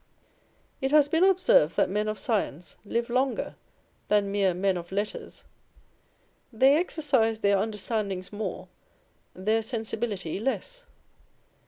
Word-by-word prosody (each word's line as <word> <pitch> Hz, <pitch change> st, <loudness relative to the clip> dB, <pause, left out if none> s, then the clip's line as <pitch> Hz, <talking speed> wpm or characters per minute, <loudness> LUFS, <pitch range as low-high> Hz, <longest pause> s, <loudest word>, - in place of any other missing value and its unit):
It 270 Hz, -, 0 dB
has 295 Hz, 0 st, +5 dB
been 325 Hz, +4 st, +3 dB
observed 385 Hz, +7 st, +4 dB
that -, -, +4 dB
men 210 Hz, +3 st, -1 dB
of 215 Hz, 0 st, -2 dB
science 185 Hz, -, -2 dB
live 235 Hz, +3 st, -2 dB
longer 255 Hz, +2 st, -1 dB, 0.5 s
than 205 Hz, -1 st, +2 dB
mere 195 Hz, -3 st, +1 dB
men 190 Hz, +1 st, +1 dB
of 175 Hz, 0 st, -7 dB
letters. 205 Hz, +2 st, -4 dB, 1.1 s
They 265 Hz, +5 st, +5 dB
exercise 270 Hz, -10 st, 0 dB
their 200 Hz, -1 st, +3 dB
understandings 210 Hz, -2 st, -3 dB
more, 215 Hz, +1 st, -5 dB, 0.7 s
their 215 Hz, +4 st, +1 dB
sensibility 220 Hz, -6 st, -3 dB
less. -, -, -3 dB
220 Hz, 120 wpm, -27 LUFS, 200-265 Hz, 1.1 s, has